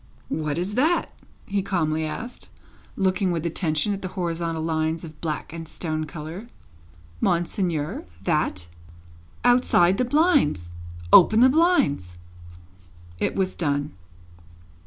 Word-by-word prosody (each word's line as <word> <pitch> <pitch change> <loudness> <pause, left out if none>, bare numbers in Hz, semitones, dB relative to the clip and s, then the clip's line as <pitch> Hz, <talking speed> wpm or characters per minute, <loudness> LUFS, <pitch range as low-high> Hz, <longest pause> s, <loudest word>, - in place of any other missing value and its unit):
"What 155 -1 -2
is 180 +4 -2
that?" 310 +9 +1 0.3
he 200 -1 -1
calmly 160 -5 0
asked, 235 +10 -7 0.5
looking 190 -1 +1
with 170 -1 -2
attention 165 +3 0
at 200 - -5
the 185 - -3
horizontal 165 -2 -2
lines 160 0 -1
of 155 -2 -11
black 155 -1 -4
and 165 -1 -7
stone 155 -1 -3
colour. 165 +7 -8 0.7
"Monseigneur? 170 - -1 0.2
That?" 95 - 0 0.8
"Outside 245 -7 +4
the - - +3
blinds. 245 - +2 0.4
Open 215 +5 +8
the 260 - +7
blinds." 255 - +2 1.0
It - - 0
was 190 -1 -1
done. 145 -2 -1
170 Hz, 115 wpm, -24 LUFS, 155-195 Hz, 1.0 s, Open